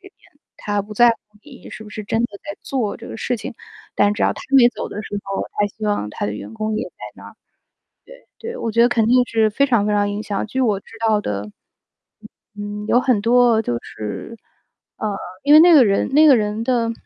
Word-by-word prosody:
边， 390 - -15 0.4
他 205 -1 -2
不 210 +2 -11
在 240 +3 +6
乎 230 - -2 0.3
你 270 -4 -14
是 215 - -9
不 215 - -12
是 215 0 -7
真 225 +2 -1
的 - - +1 0.2
在 300 - -7
做 245 -7 -2
这 - - -11
个 - - -7
事 245 +2 -2
情， 225 - -7 0.4
但 205 0 +3
只 210 - -3
要 - - +3
他 - - -10 0.2
没 245 -2 +7
走 230 -3 -6
的 210 - -6
时 205 - -5
候， 195 0 -3 0.2
他 205 - +3
希 215 +2 -9
望 205 - -1
他 - - -4
的 105 - -3
员 105 - -8
工 215 -1 -2
也 215 - -2
在 - - -15 0.2
那 - - -13
儿。 - - -12 0.8
对 - - -27 0.3
对， 480 - -8
我 230 - -3
觉 230 - +3
得 240 - +6
肯 225 -2 +2
定 250 +1 +4
是 220 -1 +2
非 275 +7 +2
常 235 -7 +1
非 - - +1
常 205 0 +1
影 205 +1 -4
响， 200 -2 -3
据 260 +5 -2
我 215 -6 +1
知 200 - -19
道 215 -1 +3
的， 105 - -4 1.0
嗯， 205 0 -6
有 245 - +4
很 250 -4 +2
多 235 0 +4
就 120 - -2
是 110 - -7 0.6
呃， 210 -2 -3 0.3
因 290 - +5
为 305 - +10
那 345 +2 +7
个 290 -5 +8
人 200 -2 +1
那 310 +2 +6
个 275 -4 +7
人 210 +1 -2
的 235 -2 0
220 Hz, 255 characters per minute, -20 LUFS, 205-245 Hz, 1.0 s, 为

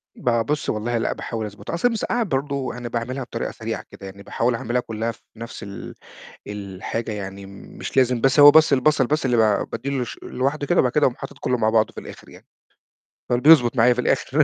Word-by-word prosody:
ب - - -2 0.2
بصّي 150 0 -1
والله 115 +2 -2
لأ 115 - -1
باحاول 115 -2 -5
أضبطها، 105 0 -8
أصل 170 +8 +2
المِسقّعة 235 +1 -1
برضه 140 - -2
أنا 120 -1 -6
باعملها 125 +3 -3
بطريقة - - -4
سريعة - - -5
كده، - - -11
يعني 100 +1 -10
باحاول 120 +3 0
اعملها 120 +2 -1
كلها 115 -1 -3
في 115 - -18
نفس 115 +2 -8
ال 100 -1 -8 0.5
الحاجة، 105 +2 -5
يعني 100 -1 -7
مش 100 +6 -9
لازم 125 -2 +3
بس 135 +4 +4
هو 145 0 +11
بس 155 0 +5
البصل 140 0 +3
بس 150 +1 0
اللي 125 -2 +2
ب 110 -3 +2
بادّي 120 +4 -4
له 125 - 0
ش - - -9
لوحده 140 +3 -2
كده، 175 - +3
وبعد 125 - +1
كده 150 - +1
اقوم 125 - -1
حاطط - - -9
كله 125 - 0
مع 110 -1 +2
بعضه 110 -1 +2
في - - -8
الآخر - - -12
يعني. - - -16 0.8
فال 120 0 +1
بيضبط 140 -4 +6
معايا 120 +2 +5
في 125 - -2
الآخر 145 +4 +2
125 Hz, 215 wpm, -22 LUFS, 110-140 Hz, 0.8 s, هو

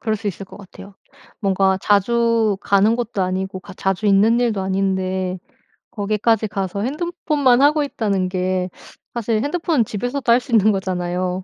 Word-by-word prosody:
그럴 220 -2 -1
수 210 0 -8
있을 195 0 -4
것 190 - -14
같아요. 195 0 -13 0.5
뭔가 190 -2 +2
자주 225 +1 +2
가는 205 +3 +3
것도 235 -5 -2
아니고 185 +1 -3
가 200 - -12
자주 195 +3 -1
있는 210 +4 +4
일도 225 -5 0
아닌데 190 -1 -1 0.5
거기까지 215 +1 0
가서 195 -1 -3
핸드폰만 295 -3 +1
하고 300 +1 +4
있다는 200 -9 -1
게 185 0 -1 0.4
사실 225 -2 -1
핸드폰은 315 -3 0
집에서도 245 +5 -4
할 235 - +6
수 255 -1 -9
있는 215 -1 +5
거잖아요. 185 -1 -2
205 Hz, 335 characters per minute, -20 LUFS, 190-235 Hz, 0.5 s, 할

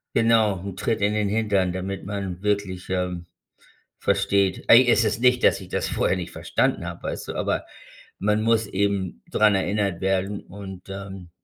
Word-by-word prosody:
Genau, 110 -4 +3
'n 100 -2 -6
Tritt 110 +3 -1
in 100 +1 +2
den 105 -1 0
Hintern, 100 -4 +1
damit 95 +1 -4
man 95 -3 -5
wirklich, 100 -3 -2
ähm, 90 -2 -2 0.7
versteht. 100 -2 +1
Ey, 125 +2 +8
es 120 -1 +4
ist 110 0 0
nicht, 125 0 +3
dass 95 - +4
ich 95 - -11
das - - -2
vorher - - +1
nicht 90 -2 -5
verstanden - - -1
habe, - - -7
weißt - - -5
du. - - -3
Aber - - -1 0.5
man 105 +2 +1
muss 115 -1 +2
eben 95 -8 -1
dran 105 -2 +4
erinnert 100 -2 0
werden 95 +1 0
und, 95 -1 -10
ähm 95 -2 -8
100 Hz, 175 wpm, -24 LUFS, 95-105 Hz, 0.7 s, Ey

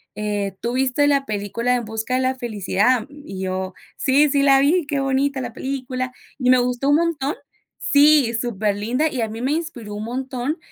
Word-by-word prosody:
eh, 205 -2 -2
¿tú 235 +1 -2
viste 265 +2 +2
la 280 -1 +2
película 215 +4 -1
En 240 -2 -2
Busca 220 +3 -3
de 260 - +1
la 260 0 +1
Felicidad?" 220 0 +1
Y 285 -10 -8
yo: 185 0 -3 0.2
"sí, 285 +2 +3
sí 280 0 +2
la 275 -1 +5
vi, 305 +5 +3
qué 285 -2 -1
bonita 270 0 0
la 245 -2 -5
película, 255 -1 -4 0.3
y 250 -2 +1
me 255 - +7
gustó 250 +2 0
un 290 - +5
montón". 315 -2 0 0.4
Sí, 285 -4 +4
superlinda, 225 +4 0
y 260 -4 -3
a 225 - 0
mí 225 +2 -6
me 260 +3 0
inspiró 255 -11 -5
un 210 - -5
montón, 260 +4 -3
255 Hz, 190 wpm, -21 LUFS, 220-280 Hz, 0.4 s, me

